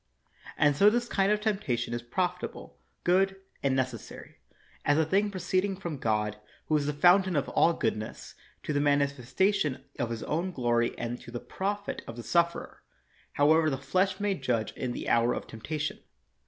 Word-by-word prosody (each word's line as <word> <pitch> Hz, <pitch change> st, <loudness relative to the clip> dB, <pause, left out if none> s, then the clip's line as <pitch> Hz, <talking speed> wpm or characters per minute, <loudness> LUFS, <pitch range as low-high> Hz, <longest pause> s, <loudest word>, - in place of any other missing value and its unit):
And 145 Hz, -1 st, +4 dB
so 200 Hz, +8 st, +7 dB
this 240 Hz, +2 st, 0 dB
kind 195 Hz, -3 st, +2 dB
of 210 Hz, -, +2 dB
temptation 140 Hz, -, -1 dB
is 120 Hz, -, -2 dB
profitable, 180 Hz, +9 st, -3 dB, 0.2 s
good, 190 Hz, +2 st, +3 dB, 0.3 s
and 135 Hz, -1 st, +1 dB
necessary, 130 Hz, -4 st, -4 dB, 0.5 s
as 145 Hz, -, +3 dB
a 160 Hz, -, +3 dB
thing 200 Hz, +6 st, +2 dB
proceeding 190 Hz, 0 st, -1 dB
from 170 Hz, -7 st, -5 dB
God, 105 Hz, -3 st, 0 dB, 0.3 s
who 155 Hz, -, +1 dB
is 145 Hz, -1 st, +1 dB
the -, -, +1 dB
fountain 180 Hz, +4 st, +4 dB
of 140 Hz, -1 st, +1 dB
all 170 Hz, -, +4 dB
goodness, 110 Hz, -6 st, -3 dB, 0.3 s
to 150 Hz, -, -2 dB
the 145 Hz, -, +2 dB
manifestation 145 Hz, -, +1 dB, 0.2 s
of 120 Hz, -3 st, 0 dB
his 115 Hz, -1 st, -4 dB
own 175 Hz, +4 st, -2 dB
glory 120 Hz, -4 st, +1 dB
and 120 Hz, +1 st, -4 dB
to -, -, -11 dB
the 120 Hz, 0 st, -5 dB
profit 200 Hz, +7 st, -3 dB
of 115 Hz, -, -7 dB
the 120 Hz, -, -7 dB
sufferer, 170 Hz, +3 st, 0 dB, 0.5 s
however 155 Hz, +2 st, +4 dB
the 135 Hz, -, -1 dB
flesh 185 Hz, +9 st, 0 dB
may 205 Hz, -1 st, +1 dB
judge 125 Hz, -, -1 dB
in 130 Hz, -, -3 dB
the -, -, -5 dB
hour 120 Hz, +1 st, +3 dB
of -, -, -5 dB
temptation. 150 Hz, +7 st, -4 dB
145 Hz, 175 wpm, -29 LUFS, 120-185 Hz, 0.5 s, so